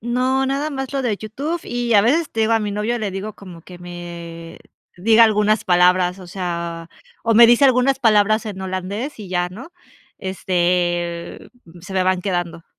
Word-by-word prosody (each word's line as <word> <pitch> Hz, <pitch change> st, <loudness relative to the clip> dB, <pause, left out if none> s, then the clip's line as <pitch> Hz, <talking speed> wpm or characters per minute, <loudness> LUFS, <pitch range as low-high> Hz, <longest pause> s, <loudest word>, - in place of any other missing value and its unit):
No, 255 Hz, +3 st, 0 dB
nada 280 Hz, +3 st, -1 dB
más 270 Hz, -2 st, -5 dB
lo 275 Hz, -1 st, -1 dB
de 230 Hz, -5 st, -1 dB
YouTube 275 Hz, -, -4 dB
y 240 Hz, -1 st, -2 dB
a 205 Hz, -, +7 dB
veces 290 Hz, +9 st, +1 dB
te 225 Hz, -, -3 dB
digo 220 Hz, +1 st, +2 dB
a 225 Hz, -, +4 dB
mi 210 Hz, -1 st, -3 dB
novio 210 Hz, +4 st, -2 dB
le 215 Hz, -3 st, -3 dB
digo 195 Hz, +3 st, -6 dB
como 180 Hz, -4 st, -12 dB
que 180 Hz, +2 st, -13 dB
me, 170 Hz, -1 st, -9 dB, 0.4 s
diga 220 Hz, +5 st, +5 dB
algunas 215 Hz, 0 st, +2 dB
palabras, 180 Hz, 0 st, +3 dB
o 185 Hz, -, -11 dB
sea, 170 Hz, -2 st, -5 dB, 0.3 s
o 230 Hz, 0 st, +1 dB
me 235 Hz, +2 st, +9 dB
dice 240 Hz, +4 st, +5 dB
algunas 260 Hz, +1 st, +3 dB
palabras 215 Hz, -2 st, +3 dB
en 200 Hz, -3 st, -6 dB
holandés 190 Hz, +9 st, -4 dB
y 205 Hz, -3 st, -9 dB
ya, 180 Hz, -1 st, -1 dB
¿no? 240 Hz, -, -11 dB, 0.5 s
Este, 175 Hz, -2 st, -2 dB, 0.3 s
se 185 Hz, +3 st, -10 dB
me 190 Hz, -1 st, +1 dB
van 185 Hz, 0 st, 0 dB
quedando. 175 Hz, -3 st, -3 dB
200 Hz, 185 wpm, -20 LUFS, 180-235 Hz, 0.5 s, me